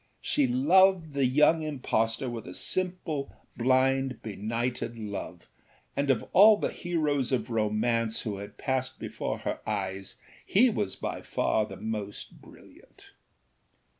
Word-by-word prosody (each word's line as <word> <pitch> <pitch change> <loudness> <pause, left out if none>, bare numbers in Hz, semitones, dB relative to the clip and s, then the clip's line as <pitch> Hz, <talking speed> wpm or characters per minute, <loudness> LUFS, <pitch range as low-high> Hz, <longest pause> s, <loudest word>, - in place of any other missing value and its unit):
She 290 -3 +1
loved 190 - +4
the 140 -2 +2
young 150 +5 +4
impostor 130 -5 -1
with 120 0 -6
a - - -8
simple, 175 -6 -2 0.2
blind, 130 +1 +2
benighted 115 +3 -3
love, 100 -5 -6 0.5
and 140 0 0
of 130 -4 +2
all 210 +2 +8
the - - -2
heroes 150 -7 -1
of 125 -2 -1
romance 110 +1 0
who 105 -3 -4
had 100 +1 -9
passed 130 -1 -2
before - - -4
her - - -2
eyes 95 0 -4 0.3
he 240 +5 +4
was 100 - -2
by - - -4
far 110 -1 0
the 95 -2 -9
most 105 -2 -6
brilliant. - - -18
130 Hz, 135 wpm, -28 LUFS, 110-155 Hz, 0.5 s, all